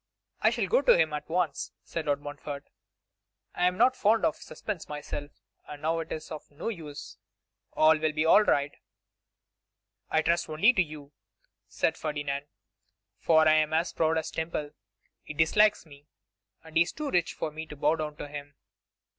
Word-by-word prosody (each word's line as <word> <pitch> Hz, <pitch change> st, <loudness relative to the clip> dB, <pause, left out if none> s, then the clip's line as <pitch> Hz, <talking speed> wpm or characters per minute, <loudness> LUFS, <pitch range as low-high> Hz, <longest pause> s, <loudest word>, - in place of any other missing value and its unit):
'I -, -, +5 dB
shall -, -, -1 dB
go -, -, +3 dB
to 485 Hz, -, +6 dB
him 155 Hz, -1 st, +2 dB
at 150 Hz, +1 st, -5 dB
once,' 165 Hz, -4 st, -1 dB
said 165 Hz, -2 st, -5 dB
Lord 145 Hz, 0 st, +1 dB
Montfort; 145 Hz, 0 st, -7 dB, 0.9 s
'I 180 Hz, -, +2 dB
am 180 Hz, 0 st, -1 dB
not 250 Hz, +3 st, +4 dB
fond 220 Hz, -1 st, +3 dB
of -, -, +1 dB
suspense 205 Hz, -6 st, -7 dB
myself, 145 Hz, -1 st, -5 dB, 0.4 s
and 145 Hz, 0 st, -9 dB
now 165 Hz, +1 st, +1 dB
it 165 Hz, -, -6 dB
is 155 Hz, 0 st, -6 dB
of 155 Hz, -, -8 dB
no 145 Hz, +9 st, -5 dB
use. 155 Hz, -9 st, -8 dB, 0.6 s
All 155 Hz, +1 st, +5 dB
will 155 Hz, 0 st, +1 dB
be 155 Hz, +1 st, 0 dB
right.' 155 Hz, -6 st, +4 dB, 1.3 s
'I 155 Hz, -, +2 dB
trust 170 Hz, +1 st, +1 dB
only 165 Hz, +11 st, +4 dB
to 195 Hz, -, +3 dB
you,' 150 Hz, -4 st, -6 dB, 0.6 s
said 160 Hz, -, 0 dB
Ferdinand; 145 Hz, -2 st, -3 dB, 0.7 s
'for 160 Hz, -1 st, +4 dB
I 155 Hz, -, +6 dB
am 155 Hz, 0 st, +2 dB
as 165 Hz, +2 st, 0 dB
proud 160 Hz, 0 st, +1 dB
as 160 Hz, 0 st, -2 dB
Temple. 160 Hz, -2 st, -3 dB, 0.5 s
He 155 Hz, -, -9 dB
dislikes 210 Hz, +6 st, +3 dB
me, 145 Hz, -1 st, -16 dB, 0.6 s
and 160 Hz, 0 st, -4 dB
he -, -, +6 dB
is 170 Hz, -, +1 dB
too 300 Hz, -2 st, -4 dB
rich 175 Hz, -2 st, +1 dB
for 155 Hz, -, -3 dB
me 160 Hz, +1 st, -7 dB
to 150 Hz, -, -9 dB
bow 150 Hz, +2 st, +2 dB
down 155 Hz, -1 st, -4 dB
to 145 Hz, -, -7 dB
him. 145 Hz, -1 st, -8 dB
155 Hz, 180 wpm, -28 LUFS, 150-170 Hz, 1.3 s, to